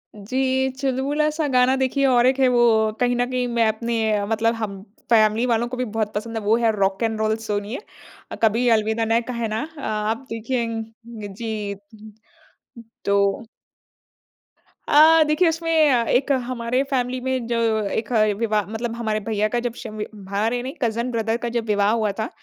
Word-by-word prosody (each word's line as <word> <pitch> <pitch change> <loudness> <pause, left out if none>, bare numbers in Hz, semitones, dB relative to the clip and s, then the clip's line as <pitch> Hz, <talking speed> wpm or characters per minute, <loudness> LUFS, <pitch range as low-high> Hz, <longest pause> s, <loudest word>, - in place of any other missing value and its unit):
जी, 260 +5 0
चुलबुला-सा 290 +4 0
गाना 250 +1 +4
देखिए 265 +1 +1
और 245 -2 +4
1 260 +1 +2
है 260 - +5
वो 230 -3 +3
कहीं 245 0 +2
न 245 - +1
कहीं 250 -1 0
मैं 235 -2 +2
अपने 220 -2 0
मतलब 225 +1 +1
हम 200 -4 -5 0.3
फैमिली 220 +1 +4
वालों 235 0 +1
को 250 - -6
भी 255 - -1
बहुत 215 -1 -3
पसंद 225 +2 -4
है - - -3
वो 215 +2 +3
है 230 -2 +2
रॉक 195 +2 0
एन 220 -1 0
रोल 220 0 +1
सोणिये 210 +3 -3 0.5
अ, - - -4
कभी 230 +3 +3
अलविदा 220 0 +2
ना 225 +1 +2
कहना 225 -2 -2 0.2
अ, 285 - -8
आप 215 +4 -2
देखेंग 230 0 -2 0.5
जी। 210 -3 -4 1.3
तो 200 +2 +1 1.4
अ, 315 +2 +7
देखिए 305 +4 +3
उसमें 325 -1 +2
अ, 240 -2 +3
एक 270 +3 +2 0.2
हमारे 250 +1 -1
फैमिली 255 -1 0
में 260 -2 -2
जो 235 -1 -1 0.3
1 225 +4 -3 0.3
विवाह 215 -3 0
मतलब 230 +1 -4
हमारे 220 -2 -1
भैया 215 0 -1
का 240 +3 -1
जब 240 -1 -3
शवी 215 -3 -5 0.2
भारे 225 +5 0
नहीं 265 +3 -5
कज़न 235 +1 -1
ब्रदर 225 0 -1
का 235 - -1
जब 235 -1 -2
विवाह 205 0 +2
हुआ 220 -2 +1
था, 220 +3 -2
230 Hz, 170 wpm, -22 LUFS, 220-250 Hz, 1.4 s, अ